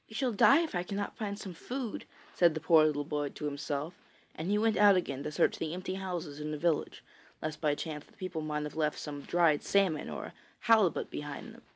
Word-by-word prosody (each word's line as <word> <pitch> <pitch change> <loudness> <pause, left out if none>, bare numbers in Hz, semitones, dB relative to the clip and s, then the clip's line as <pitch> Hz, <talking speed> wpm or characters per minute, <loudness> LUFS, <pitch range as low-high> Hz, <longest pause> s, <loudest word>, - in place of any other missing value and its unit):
] - - -33
'We 220 - -11
shall 255 +1 +1
die 275 +8 +6
if 330 - -3
I 175 - 0
cannot 200 +2 -4
find 205 -2 -4
some 195 -3 -7
food,' 245 +6 -5 0.3
said 170 -3 +4
the - - -1
poor 160 0 +6
little 145 -1 -1
boy 145 -1 -2
to 150 - -7
himself, 145 +2 -3 0.4
and 160 +4 -4
he 205 - +3
went 220 0 +2
out 205 -1 +7
again 140 -7 -1
to 150 - -4
search 165 - +2
the 160 +1 -2
empty 185 +1 -4
houses 175 -6 -4
in 150 0 -4
the 150 - -3
village, 165 0 -1 0.4
lest 155 -1 -5
by 150 -2 +2
chance 150 -1 -5
the - - -24
people 185 -4 -5
might 150 -1 -2
have 150 - -6
left 150 -1 0
some 145 -1 -6
dried 165 -2 +3
salmon 190 -6 +1
or - - -5
a - - -10 0.3
halibut 220 -6 +3
behind 145 -1 -6
them. - - -15
165 Hz, 235 wpm, -31 LUFS, 150-195 Hz, 0.4 s, out